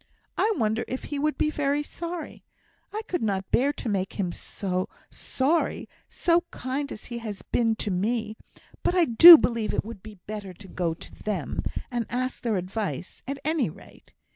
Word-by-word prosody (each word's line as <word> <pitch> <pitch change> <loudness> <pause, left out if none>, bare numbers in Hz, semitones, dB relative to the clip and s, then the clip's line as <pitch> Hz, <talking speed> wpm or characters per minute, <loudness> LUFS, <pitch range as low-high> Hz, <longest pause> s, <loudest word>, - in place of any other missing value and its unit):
I 440 - +2
wonder 220 -1 0
if 255 - -4
he 290 - -4
would 305 +1 0
be 305 - +1
very 290 0 0
sorry! 335 +2 -7 0.5
I 430 +1 -4
could 355 - -2
not 195 -3 -1
bear 275 +4 +3
to 255 - -6
make 195 -3 -1
him 185 -4 -2
sorry, 200 - -2 0.2
so 345 0 +2
kind 270 +3 -4
as - - -7
he 235 -1 -5
has 215 -4 -7
been 225 -2 +1
to 215 -2 -3
me; 215 +4 -1 0.5
but 360 - +1
I 355 -2 +5
do 325 +8 +11
believe 230 -6 -1
it - - -1
would 220 -3 -8
be 215 0 -11
better 205 -3 -6
to 195 +2 -13
go 170 -3 -2
to - - -11
them, 210 -2 -2 0.3
and 240 -3 -2
ask 255 +1 -2
their 225 -4 0
advice, 185 +1 -4
at 275 +1 -3
any 310 - +1
rate. - - -16
230 Hz, 180 wpm, -26 LUFS, 205-290 Hz, 0.5 s, do